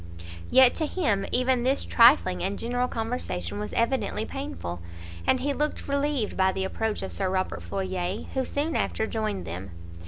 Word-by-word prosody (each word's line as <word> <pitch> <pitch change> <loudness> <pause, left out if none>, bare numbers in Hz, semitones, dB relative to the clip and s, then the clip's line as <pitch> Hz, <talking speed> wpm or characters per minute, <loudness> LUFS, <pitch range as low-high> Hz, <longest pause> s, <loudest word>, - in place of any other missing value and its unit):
Yet, 260 -1 +7
to 315 - +1
him, 215 - 0
even 255 0 +3
this 265 +3 +2
trifling 235 -6 +5
and 195 +2 -1
general 245 +1 -1
conversation 220 - -3
was 105 0 -4
evidently 230 -3 0
painful, 270 - -5 0.5
and 260 - +3
he 285 +2 0
looked 300 +2 -2
relieved 280 -5 0
by 190 0 +3
the 190 - -2
approach 220 +2 -2
of - - -5
Sir 190 -2 -1
Robert 185 0 -1
Floyer, 190 0 -3
who 265 - 0
soon 290 +5 -2
after 220 - 0
joined 215 -3 -2
them. 90 +3 -6
225 Hz, 165 wpm, -26 LUFS, 190-265 Hz, 0.5 s, Yet